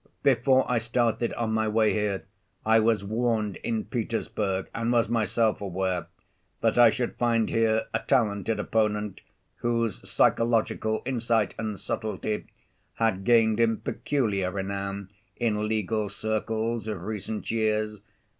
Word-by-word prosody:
Before 130 +2 +4
I 125 -1 +2
started 120 0 0
on 115 -2 -1
my 110 0 +1
way 110 0 +3
here, 105 -3 -1 0.4
I 110 +1 +5
was 110 -2 +2
warned 110 -1 0
in 115 -2 -2
Petersburg, 105 -5 -2
and 115 +1 -1
was 120 -2 +2
myself 110 -1 +1
aware, 95 -2 -2 0.5
that - - +2
I 120 -1 +8
should 120 +2 -2
find 115 -2 +2
here 110 -1 +2
a - - +2
talented 110 -2 +1
opponent 105 -2 0 0.4
whose 115 -3 -1
psychological 110 -1 +2
insight 115 -4 +1
and 110 -3 -3
subtlety 110 -1 -3 0.5
had 110 -4 0
gained 115 -2 +4
him 115 -1 +3
peculiar 105 -10 -1
renown 100 0 -4 0.3
in 105 -3 0
legal 110 -1 -1
circles 110 +2 -2
of 105 -6 -4
recent 105 +1 -4
years. 110 -2 0
110 Hz, 130 wpm, -27 LUFS, 105-115 Hz, 0.5 s, I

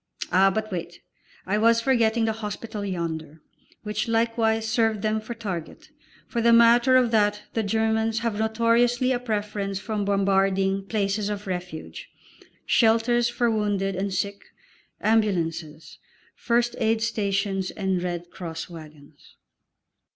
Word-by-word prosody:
Ah, 195 +1 +5
but 215 +2 -3
wait! 170 -1 -6 0.4
I 205 +3 0
was 230 +1 +4
forgetting 230 -2 +2
the 220 - +1
hospital 215 0 -6
yonder, 165 -5 -4 0.4
which 210 +1 -2
likewise 225 -1 +1
served 225 -2 +1
them 215 0 0
for 235 +2 -7
target; 190 -8 -6 0.4
for 235 - -2
the 235 +1 +4
matter 235 +2 +6
of 250 -3 +4
that 210 -1 +2
the 225 - 0
Germans 220 +1 0
have 230 -3 -2
notoriously 235 +3 +2
a 245 - +1
preference 210 -4 -3
for 215 +3 -5
bombarding 195 -1 +1
places 205 -1 -1
of 205 0 -4
refuge, 180 -4 -6 0.6
shelters 235 +1 +3
for 240 -1 0
wounded 205 -3 -1
and 195 +2 -2
sick, 200 +2 -2 0.6
ambulances, 170 -8 -1 0.3
first 240 0 0
aid 225 -1 +1
stations 200 -3 -1
and 190 -3 -2
Red 175 -1 -4
Cross 165 -1 -7
wagons. 155 -3 -14
210 Hz, 130 wpm, -25 LUFS, 195-225 Hz, 0.6 s, matter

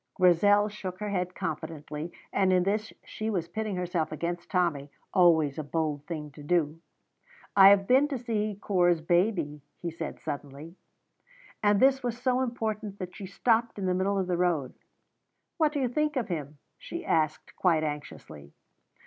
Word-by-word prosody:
Grizel 205 +3 +5
shook 190 -3 -6
her 210 - -3
head 180 -2 -2
confidently, 155 +1 -5 0.2
and 190 -1 +3
in 180 -1 +4
this 210 +3 -1
she 220 0 -4
was 180 -6 -1
pitting 215 +2 -3
herself 175 -3 -1
against 170 +2 -4
Tommy, 165 -7 0 0.2
always 160 -6 +4
a - - -2
bold 150 -1 -2
thing 150 -3 -5
to 150 - -13
do. 155 0 0 0.8
"I 195 -1 +10
have 200 -1 +5
been 265 +6 +4
to 280 -3 -3
see 215 -4 -2
Corp's 175 -5 +2
baby," 170 -3 +1 0.2
he 170 - -4
said 160 -1 -6
suddenly; 145 +3 -7 0.9
and 205 -1 +4
this 265 +2 +4
was 240 -2 -2
so 255 0 +1
important 220 -4 -3
that 180 -2 -7
she 195 - -7
stopped 230 +4 +1
in 195 - -3
the 185 - +2
middle 190 +2 0
of 190 - +1
the 180 -1 -1
road. 170 -7 0 0.8
"What 310 -2 +3
do 295 - -2
you 260 - +1
think 300 +4 0
of 250 -6 -1
him?" 150 -4 -4 0.2
she 340 0 -7
asked, 155 -1 0
quite 165 -4 +2
anxiously. 80 - -7
180 Hz, 170 wpm, -28 LUFS, 160-210 Hz, 0.9 s, I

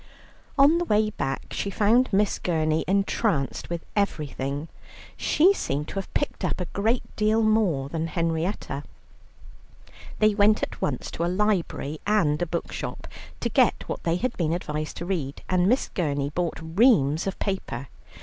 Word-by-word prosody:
On 290 +5 +6
the 350 - -1
way 215 -5 +2
back 135 -8 -4
she 200 - -2
found 220 +6 +3
Miss 205 +1 +2
Gurney 160 -2 +1
entranced 195 - 0
with 170 -1 -4
everything; 145 -6 -2 0.5
she 365 +6 +4
seemed 150 - -3
to 195 - -3
have 195 - -7
picked - - -1
up - - -1
a 180 - -2
great 220 +8 0
deal 215 +1 +2
more 205 -11 +2
than 160 +2 -2
Henrietta. 165 -3 -2 1.3
They 215 -1 +4
went 210 +1 +4
at - - -4
once 125 -4 -2
to 170 - -3
a - - +1
library 180 -6 -1
and 170 -8 +2
a 175 - 0
bookshop 170 +1 -4 0.4
to - - 0
get - - +2
what - - -4
they 165 0 +1
had 245 +7 -1
been 165 -2 +1
advised 155 -3 -3
to 170 - -4
read, 160 -7 -3
and 185 0 +2
Miss 255 +4 +2
Gurney 145 -5 -1
bought 175 +1 -1
reams 165 - +3
of 195 - -3
paper. 165 - -3
180 Hz, 160 wpm, -25 LUFS, 155-210 Hz, 1.3 s, On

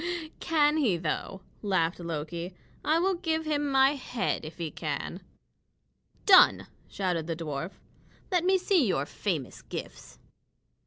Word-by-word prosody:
"Can 305 -2 +3
he, 230 - +2
though?" 170 +3 -3 0.2
laughed 185 -5 +1
Loki. 170 +2 -5 0.3
"I 310 +2 +3
will 380 +3 +2
give 325 -3 -1
him 295 -2 0
my 270 0 +5
head 255 - -2
if 155 +1 -8
he 165 -3 -4
can." 155 +4 -4 1.0
"Done!" 375 -2 +7 0.2
shouted 180 -5 -2
the 165 - -2
dwarf. 160 +2 -4 0.6
"Let 355 -2 +2
me 380 +1 +4
see 365 - +3
your 145 -7 +1
famous 155 - -3
gifts." - - -8
195 Hz, 135 wpm, -28 LUFS, -, 1.0 s, Done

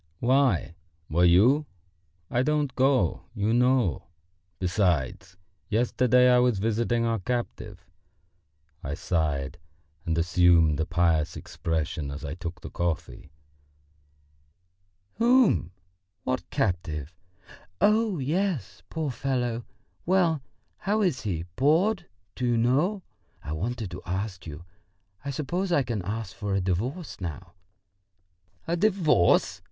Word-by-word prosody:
"Why, 125 - +2 0.4
were 85 +3 +4
you? 120 - +5 0.6
I 120 - +2
don't 150 -1 0
go, 130 0 +2
you 105 +1 +1
know. 125 - +2 0.5
Besides, 90 -1 -1 0.3
yesterday 125 +2 +3
I 125 0 +6
was 125 -3 +3
visiting 115 +3 0
our 115 -1 0
captive...." 110 -3 -4 1.0
I 70 +1 -4
sighed 75 -5 -1 0.4
and 80 -1 -1
assumed 85 -3 +4
a 80 - 0
pious 85 -2 +1
expression 80 -2 -3
as 75 +3 -6
I 70 - -4
took 85 0 -7
the - - -8
coffee. 85 -2 -3 1.9
"Whom?... 235 - +4 0.5
What 130 0 -2
captive?... 85 - -2 0.6
Oh, 215 -2 +3
yes! 145 - -2
Poor 160 -4 -2
fellow! 125 -3 -2 0.4
Well, 175 -5 +3 0.4
how 210 +2 0
is 175 -8 0
he 85 -6 -3
bored? 165 - +2 0.3
Do 125 - -2
you 120 -1 +2
know... 150 - +1 0.4
I 75 - -6
wanted 105 +5 -3
to 90 - -7
ask 95 0 -4
you.... 80 +2 -9 0.6
I 140 - -4
suppose 170 +7 -2
I 145 -5 +3
can 115 -4 -3
ask 105 +2 -5
for 100 -1 -2
a - - +2
divorce 115 - -2
now?" 85 +1 -6 1.1
"A 170 - +1
divorce!" 175 - +3
115 Hz, 115 wpm, -27 LUFS, 85-140 Hz, 1.9 s, I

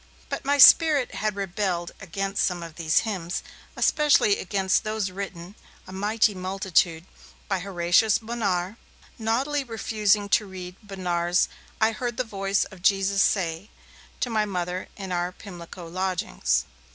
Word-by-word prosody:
But - - -4
my 285 +1 +2
spirit 290 -1 +7
had 215 -1 -2
rebelled 185 -3 -2
against 195 +2 -2
some 175 -2 -1
of 165 -2 -9
these 160 -2 +2
hymns, 185 -6 -4 0.3
especially 290 -9 +3
against 190 0 0
those 215 -3 -2
written 190 -1 -7 0.3
a 185 - -11
mighty 210 +2 +1
multitude 185 -2 0 0.4
by 195 -2 0
Horatius 180 +2 +2
Bonar; 220 -4 -2 0.4
naughtily 265 +6 0
refusing 215 -3 +1
to 210 +1 +2
read 180 -1 -8
Bonar's 180 -3 0 0.3
'I 220 0 +4
heard 240 +1 -4
the 255 - +1
voice 195 -3 0
of 190 -3 -12
Jesus 195 +1 +2
say' 180 0 0 0.5
to 245 - -1
my 215 -1 +2
Mother 180 -2 -3
in 195 -2 -6
our 175 0 -1
Pimlico 175 -2 -10
lodgings. 170 - -1
195 Hz, 140 wpm, -25 LUFS, 180-215 Hz, 0.5 s, spirit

